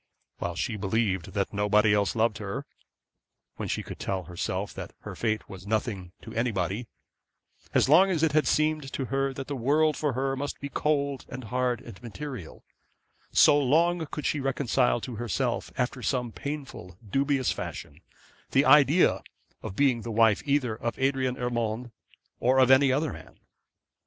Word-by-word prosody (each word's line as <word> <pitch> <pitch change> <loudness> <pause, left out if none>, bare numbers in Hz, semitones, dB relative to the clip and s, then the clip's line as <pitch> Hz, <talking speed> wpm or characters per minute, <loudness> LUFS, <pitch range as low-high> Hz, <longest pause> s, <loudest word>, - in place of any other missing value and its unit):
While 85 -1 -3
she 95 +6 -2
believed 95 -3 -1
that 100 0 -1
nobody 105 +1 +3
else 100 -1 +1
loved 110 -1 +1
her; 110 +7 -5 0.9
when - - -4
she - - -2
could - - -9
tell 95 -1 -2
herself 85 0 -4
that - - -8
her - - -8
fate 110 -2 -1
was 95 0 -10
nothing 105 -4 -2
to - - -9
anybody; 110 -1 -1 0.9
as - - +4
long 180 +7 +6
as 165 -4 0
it 160 - +3
had 155 +1 +2
seemed 155 -2 +1
to 135 - -2
her 135 0 +1
that 135 0 -6
the 145 - -4
world 150 +5 +2
for 150 -3 -1
her 135 +2 -1
must 140 +2 -4
be 140 - -5
cold, 140 -2 -1
and 130 0 -7
hard, 125 +1 -1
and 90 - -12
material; 125 - -8 0.7
so 145 - +6
long 165 +5 +2
could 150 - -6
she 150 - 0
reconcile 135 -2 +1
to 120 -2 -6
herself, 120 +1 -2
after 125 0 -1
some 125 +1 -1
painful, 135 - -7
dubious 135 +2 +1
fashion, 75 +4 -7 0.5
the 135 +2 +4
idea 150 +5 +5 0.4
of 95 - -6
being 130 -3 +2
the 115 - -6
wife 110 -1 +4
either 140 -5 +1
of 120 +1 -4
Adrian 130 -1 0
Urmand, 120 -1 -2 0.5
or 130 +2 +3
of 130 -1 +5
any 135 0 +6
other 145 +4 0
man. - - -13
125 Hz, 165 wpm, -27 LUFS, 110-140 Hz, 0.9 s, long